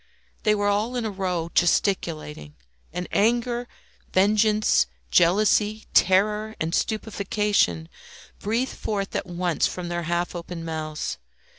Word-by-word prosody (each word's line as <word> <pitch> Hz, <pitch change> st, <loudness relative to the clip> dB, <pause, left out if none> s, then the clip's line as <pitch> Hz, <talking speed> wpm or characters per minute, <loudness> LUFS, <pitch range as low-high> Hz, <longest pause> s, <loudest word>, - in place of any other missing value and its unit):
They 215 Hz, 0 st, +3 dB
were 205 Hz, -1 st, -1 dB
all 210 Hz, +4 st, +1 dB
in 240 Hz, -2 st, -1 dB
a 215 Hz, -, -2 dB
row 180 Hz, -4 st, -2 dB
gesticulating, 160 Hz, -, 0 dB, 0.4 s
and 180 Hz, +1 st, -4 dB
anger, 240 Hz, +3 st, +1 dB, 0.4 s
vengeance, 210 Hz, -, +3 dB, 0.2 s
jealousy, 210 Hz, -, +3 dB
terror, 210 Hz, +4 st, +3 dB
and 160 Hz, +1 st, -2 dB
stupefaction 205 Hz, -, 0 dB, 0.5 s
breathed 230 Hz, +5 st, -1 dB
forth 200 Hz, -2 st, -3 dB
at -, -, -2 dB
once 175 Hz, -1 st, 0 dB
from 180 Hz, -1 st, -5 dB
their 175 Hz, 0 st, -2 dB
half 175 Hz, 0 st, -1 dB
opened 170 Hz, -1 st, -6 dB
mouths. 155 Hz, -1 st, -4 dB
195 Hz, 120 wpm, -24 LUFS, 170-215 Hz, 0.5 s, They